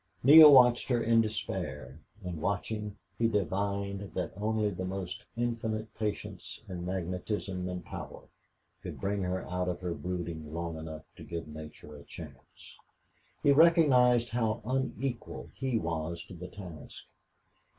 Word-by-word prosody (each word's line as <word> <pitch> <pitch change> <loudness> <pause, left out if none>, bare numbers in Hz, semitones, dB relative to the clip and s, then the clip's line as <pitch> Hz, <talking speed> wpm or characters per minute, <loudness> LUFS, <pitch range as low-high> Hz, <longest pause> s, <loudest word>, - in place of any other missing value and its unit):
Neale 150 +3 +11
watched 125 -3 +6
her 120 -2 +2
in 115 0 +5
despair, 75 - -4 0.2
and, 90 -4 -5
watching, 105 +2 -2 0.2
he 115 - +4
divined 100 -2 -2
that 90 - -2
only 105 +1 0
the 95 0 -5
most 95 +1 -5
infinite 110 -2 -2
patience 105 -2 -5
and 90 -2 -5
magnetism 90 +1 -3
and 90 -1 -5
power - - -8 0.6
could - - -7
bring 100 0 -1
her 90 0 -2
out 90 0 -1
of 90 - -3
her 90 -2 -2
brooding 85 -4 -5
long 85 -1 -3
enough 80 0 -7
to - - -10
give 85 -2 -5
nature 75 0 -10
a 70 - -11
chance. 70 -4 -12 0.6
He 145 - +6
recognized 135 -7 +5
how 115 -1 -1
unequal 130 -1 -3
he 130 -3 -1
was 85 -1 -3
to - - -11
the 90 +1 -8
task. 90 -7 -10
95 Hz, 140 wpm, -30 LUFS, 85-115 Hz, 0.6 s, Neale